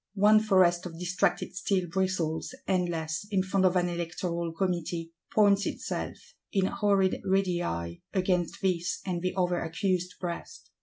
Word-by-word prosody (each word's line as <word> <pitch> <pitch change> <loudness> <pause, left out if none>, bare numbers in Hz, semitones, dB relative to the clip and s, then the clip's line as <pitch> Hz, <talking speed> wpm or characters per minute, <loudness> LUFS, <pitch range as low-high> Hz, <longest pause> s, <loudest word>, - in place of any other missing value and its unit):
One 210 +2 +6
forest 185 -4 +3
of 165 -2 -9
distracted 180 +1 0
steel 190 -1 0
bristles, 180 +2 -1
endless, 175 -2 -1
in 195 -3 +2
front 190 0 +3
of 180 - +1
an 180 -1 +3
Electoral 170 0 -3
Committee; 170 -2 -2 0.2
points 205 -1 +4
itself, - - -4 0.3
in 195 -2 +2
horrid 195 -1 +2
radii, 175 - 0
against 180 -3 0
this 180 -1 0
and 180 -3 -2
the 185 +1 -1
other 180 -1 +2
accused 180 +1 -1
breast. 175 -2 -6
180 Hz, 140 wpm, -29 LUFS, 170-190 Hz, 0.3 s, One